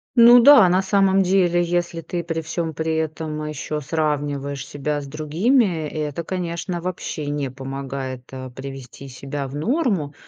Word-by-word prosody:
Ну 240 +1 +9
да, 275 -7 +8
на 185 +2 +3
самом 195 0 +3
деле, 180 -2 +3
если 175 -1 -1
ты 170 +1 -4
при 165 -1 -3
всём 160 0 -3
при 160 +1 -2
этом 155 -1 -3
ещё 150 0 -4
сравниваешь 145 -2 -2
себя 145 +1 -3
с - - -8
другими, 165 - +1
это, 150 +1 -4
конечно, 175 0 -4
вообще 170 -4 -4
не 145 -3 -2
помогает, 135 -1 -6
э, 130 -1 -7
привести 135 +1 -9
себя 135 +2 -5
в 135 - -8
норму. 195 - 0
155 Hz, 150 wpm, -22 LUFS, 140-175 Hz, -, Ну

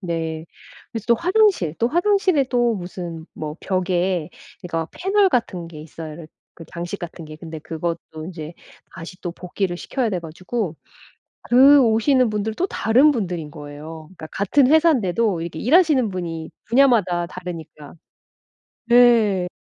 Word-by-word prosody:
네. 165 -3 -4 0.5
그래서 225 -2 -5
또 235 - +6
화장실 360 - +2
또 235 - +2
화장실에 355 -3 +2
또 240 -2 +2
무슨 175 -3 -7
뭐 155 0 -6
벽에 180 -2 -1 0.3
이거 165 -2 -3
패널 390 +1 +2
같은 190 - -1
게 155 -2 -10
있어요, 155 0 -9
이렇 160 0 -10 0.3
그 165 - -11
장식 175 +4 -6
같은 170 -1 -8
게. 155 0 -10
근데 160 0 -8
그것도 160 -1 -5
인제 165 -2 -8 0.4
다시 185 +1 -10
또 175 - -4
복귀를 180 0 -3
시켜야 250 +5 -2
돼 180 -3 -2
가지고 175 +2 -4 0.7
그 275 +3 +7
오시는 235 +2 +3
분들도 215 - -2
다른 260 +4 +4
분들인 175 - -3
거예요. 150 +2 -9
그러니까 160 - -8
같은 250 - +2
회사인데도 230 - +2
이렇게 170 -1 -6
일하시는 290 - +4
분이 165 -3 -5 0.2
분야마다 225 -9 +3
다르니까. 165 -5 -9 1.0
네. 230 -6 +5
185 Hz, 310 characters per minute, -21 LUFS, 165-240 Hz, 1.0 s, 그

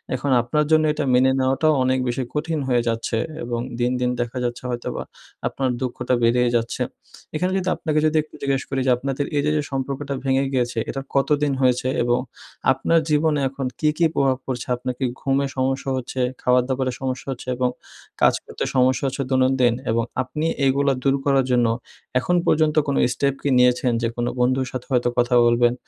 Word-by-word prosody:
এখন 135 +2 -2
আপনার 150 +6 0
জন্য 155 0 +5
এটা 150 0 -2
মেনে 130 +1 +5
নেওয়াটাও 135 +4 +2
অনেক 130 0 +1
বেশি 125 +2 -1
কঠিন 160 +1 -1
হয়ে 125 -2 +2
যাচ্ছে 115 0 -1 0.3
এবং 120 0 -3 0.2
দিন, 120 +1 +1
দিন 125 - +2
দেখা 120 +1 -4
যাচ্ছে 120 0 -3
হয়তোবা 120 -1 -4 0.4
আপনার 135 -1 -1
দুঃখটা 130 0 -2
বেড়েই 120 +1 +3
যাচ্ছে। 115 -1 -1 0.5
এখানে 180 +4 0
যদি 185 -1 -1
আপনাকে 155 -2 0
যদি 155 0 +2
একটু 155 - -17
জিজ্ঞেস 135 -1 0
করি 135 - -1
যে - - +5
আপনাদের 135 +2 -2
এইযে 145 +1 +1
যে - - +1
সম্পর্কটা 140 +1 -3
ভেঙে 135 0 +2
গিয়েছে, 120 -2 0
এটা 135 - -3
কতদিন 145 +1 +2
হয়েছে 125 -1 +2 0.2
এবং 120 0 +2 0.5
আপনার 135 +5 +2
জীবনে 150 0 +2
এখন 135 0 -5
কি, 155 - +3
কি 170 - +3
প্রভাব 135 -2 +2
পড়ছে? 125 -2 -4
আপনার 125 +1 -3
কি 135 - 0 0.2
ঘুমের 135 0 +1
সমস্যা 135 +1 -1
হচ্ছে, 130 +1 -5 0.2
খাবার 125 0 +3
দাবারের 130 -1 -1
সমস্যা 130 -1 -3
হচ্ছে 130 - -7
এবং 125 0 +1 0.5
কাজ - - +6
করতে - - -5
সমস্যা 130 0 +3
হচ্ছে 135 +1 -2
দৈনন্দিন? 130 -2 +3 0.2
এবং 115 +1 +1 0.2
আপনি 150 +5 -4 0.2
এগুলো 140 +1 +3
দূর 135 0 +3
করার 135 -2 +3
জন্য 120 -1 +3 0.5
এখন 180 +7 0
পর্যন্ত 155 -1 +3
কোনো 140 - 0 0.2
স্টেপ 140 -1 0
কি 145 - +1
নিয়েছেন? 125 0 +3
যে 115 - +1
কোনো 120 0 -1
বন্ধুর 130 +1 +2
সাথে 125 -1 -5
হয়তো 125 -1 +2
কথা 120 0 +2
বলবেন 120 0 +4
130 Hz, 185 wpm, -22 LUFS, 125-140 Hz, 0.5 s, কাজ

